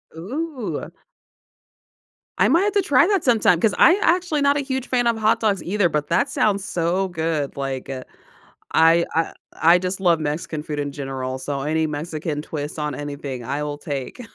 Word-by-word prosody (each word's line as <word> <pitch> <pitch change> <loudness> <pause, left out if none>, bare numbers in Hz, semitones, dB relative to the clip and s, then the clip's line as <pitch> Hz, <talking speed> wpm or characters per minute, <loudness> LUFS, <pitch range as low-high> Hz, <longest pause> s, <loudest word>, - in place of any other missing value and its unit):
Ooh. 255 - -4 1.5
I - - +4
might 335 +6 +4
have 415 - 0
to 405 - +3
try 290 -2 +4
that 395 -4 +1
sometime, 220 -8 +4
'cause 215 0 +2
I 345 - +7
actually 340 -5 +2
not 280 0 +3
a - - +1
huge 265 -2 -3
fan 245 -2 +1
of 230 -1 +2
hot 220 +1 +2
dogs 200 -6 0
either, 195 +1 +1
but 150 -3 -2
that 180 +11 +2
sounds 200 -7 +1
so 180 +2 0
good, 160 -4 -2
like, 135 -2 -4
uh, 130 -1 -5 0.7
I, 165 +1 +5
uh, 165 0 0 0.3
I 170 +2 +6
just 185 +1 -3
love 170 -4 +3
Mexican 150 0 -3
food 150 -1 -5
in 145 -1 -3
general, 135 -2 -4
so 140 0 -4
any 155 +2 0
Mexican 150 0 -4
twist 150 0 -6
on 150 -1 -2
anything 140 -3 -6
I 140 +5 -2
will 145 0 -4
take. 145 - -5
165 Hz, 185 wpm, -22 LUFS, 145-230 Hz, 1.5 s, I